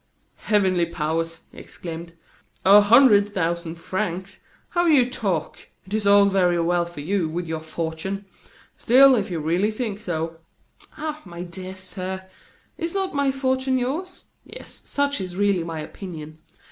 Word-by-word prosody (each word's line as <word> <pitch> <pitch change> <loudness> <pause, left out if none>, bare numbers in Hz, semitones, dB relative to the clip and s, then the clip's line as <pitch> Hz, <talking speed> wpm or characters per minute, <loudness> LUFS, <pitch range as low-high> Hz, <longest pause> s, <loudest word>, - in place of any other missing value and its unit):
"Heavenly 190 -5 +2
powers!" 165 0 -2
he - - -12
exclaimed; 165 0 -8 0.5
"a 200 +2 +9
hundred 205 -2 +6
thousand 170 -1 -1
francs! 185 +2 -4 0.3
how 345 -1 +1
you 275 -6 +5
talk! 200 - -3 0.2
It 190 - -10
is 215 -2 0
all 200 0 +7
very 180 -3 +2
well 170 +1 +1
for 170 -4 -9
you, 175 +1 0
with 175 +2 -3
your 160 0 -3
fortune! 160 +5 -4 0.5
Still, 265 +3 +7
if 210 -6 0
you 170 -3 -3
really 170 +7 +1
think 215 -2 -4
so 165 -3 -4 0.3
" - - -26
"Ah! 310 0 -4
my 175 -2 -8
dear 185 +2 -8
sir, 190 0 -6 0.5
is 335 +2 -3
not 385 -1 -1
my 280 -1 +2
fortune 260 0 0
yours? 300 +10 -3 0.2
Yes, - - -11
such 285 -2 0
is 180 -1 -6
really 200 -3 +2
my 165 -2 -5
opinion. 155 -2 -9
190 Hz, 155 wpm, -23 LUFS, 170-235 Hz, 0.5 s, a